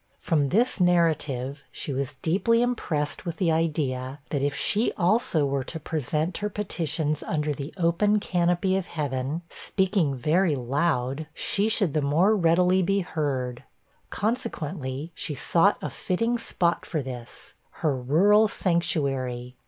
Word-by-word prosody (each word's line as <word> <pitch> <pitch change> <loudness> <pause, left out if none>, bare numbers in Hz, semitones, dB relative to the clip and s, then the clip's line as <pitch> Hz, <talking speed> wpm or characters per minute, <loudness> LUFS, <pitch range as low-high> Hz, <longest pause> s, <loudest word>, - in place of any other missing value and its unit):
From 145 -4 +1
this 230 - +2
narrative, 150 -6 +1
she 140 - -4
was 135 +1 -3
deeply 230 +8 +2
impressed 160 -12 -1
with 170 -3 -5
the 175 -3 +2
idea, 145 -5 -1
that 145 - 0
if 140 0 0
she 210 +9 +1
also 185 - +2
were 140 -1 -1
to 160 - -6
present 155 +2 -2
her 210 - -2
petitions 160 -6 -2
under 150 -2 -1
the 140 +2 -6
open 190 +5 +2
canopy 180 0 +1
of 190 -2 -2
heaven, 145 +1 -3
speaking 190 -8 0
very 155 +5 +2
loud, 135 +2 -1
she 205 +2 0
should 200 -8 +2
the 155 - +1
more 165 +10 +3
readily 180 +1 +3
be 195 +2 +1
heard; 135 -7 -3 0.5
consequently, 160 - -3
she 150 - -4
sought 170 +8 +3
a - - -2
fitting 230 +6 -1
spot 175 -6 0
for 155 -5 -3
this, 125 -3 -8 0.3
her 145 -3 +3
rural 185 - +4
sanctuary. 135 - -1
160 Hz, 140 wpm, -26 LUFS, 140-185 Hz, 0.5 s, rural